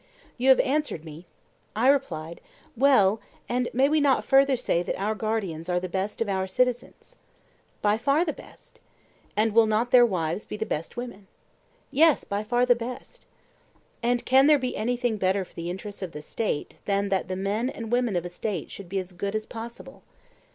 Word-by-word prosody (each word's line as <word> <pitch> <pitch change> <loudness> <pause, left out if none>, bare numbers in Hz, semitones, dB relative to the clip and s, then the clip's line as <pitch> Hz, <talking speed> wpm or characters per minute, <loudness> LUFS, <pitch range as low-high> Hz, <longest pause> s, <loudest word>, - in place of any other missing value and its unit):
You 260 +2 +3
have 265 - +7
answered 280 - -1
me, 160 +3 -11 0.5
I 230 +4 +2
replied: 170 - 0 0.3
Well, 225 -6 +4 0.3
and 245 0 0
may 265 +3 +3
we 305 +1 +2
not 280 -2 +3
further 270 0 +5
say 175 -8 0
that 180 - -3
our 210 +3 0
guardians 200 -7 -3
are 180 0 +2
the 185 - -4
best 190 +4 -3
of 230 - +1
our 190 -1 -1
citizens? 250 - -2 0.7
By 210 +1 +2
far 280 +8 +2
the 310 - -2
best. - - -15 0.6
And 215 0 +2
will 225 0 +5
not 220 +3 0
their 250 -1 +8
wives 180 -4 0
be 210 - -7
the 220 - -2
best 160 +3 -4
women? 240 -5 -7 0.6
Yes, 315 0 +4
by 200 0 -3
far 245 +3 +2
the 250 - +6
best. 245 - -8 0.7
And 240 0 0
can 265 +2 +5
there 300 -1 +6
be 255 -2 -3
anything 240 0 -1
better 190 0 +1
for - - -23
the 170 +1 -5
interests 200 +3 -7
of 185 -3 -5
the 150 - -8
State 200 -4 -3
than 200 0 0
that 190 -1 0
the 185 - -3
men 205 +6 -1
and 230 -4 -7
women 245 -4 +1
of 175 0 -1
a - - -4
State 180 -1 -4
should 195 -3 -9
be 195 - -2
as 185 -1 -4
good 200 +3 -4
as 215 0 -2
possible? 230 +1 -9
215 Hz, 195 wpm, -26 LUFS, 190-250 Hz, 0.7 s, their